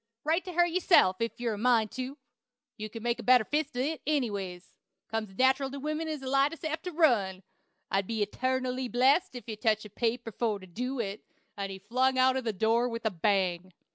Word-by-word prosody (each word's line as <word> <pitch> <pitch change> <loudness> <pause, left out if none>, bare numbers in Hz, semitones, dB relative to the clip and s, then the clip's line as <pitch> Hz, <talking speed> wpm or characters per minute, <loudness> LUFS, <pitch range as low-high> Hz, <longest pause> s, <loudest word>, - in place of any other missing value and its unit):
Write 325 +4 +1
to 365 - -7
her 350 +1 +4
yourself, 340 - +4
if 230 +1 -3
you're 235 -2 -1
a - - -5
mind 230 -2 +3
tu. 260 +2 -5 0.6
You 215 0 -6
can 225 +1 -8
make 240 0 0
a - - -6
better 250 -2 +6
fist 295 +2 -2
at 250 - +1
it, 310 +2 -2
anyways. 200 -11 -2 0.3
Comes 225 -1 -3
as 190 - -17
nateral 265 +1 +3
to 280 +1 -7
women 305 +3 -3
to 300 -4 -4
lie 275 +2 +3
as 330 - -9
sap 315 0 -3
to 360 - -5
run. 220 - +2 0.5
I'll 195 - +3
be 210 +1 -1
etarnally 255 +2 -2
blessed 265 +7 +3
ef 245 - -7
I 225 - -4
touch 215 0 0
paper 235 0 -1
for 220 0 -1
to 190 - -12
do 250 +8 -4
it." 205 -2 -3 0.3
And 195 -1 -4
he 190 - -6
flung 255 +6 +1
out 260 0 +4
of 260 -2 -2
the 225 - +1
door 225 +4 +2
with 230 -1 -6
a 220 - +2
bang. 185 -1 0
245 Hz, 220 wpm, -29 LUFS, 210-270 Hz, 0.6 s, better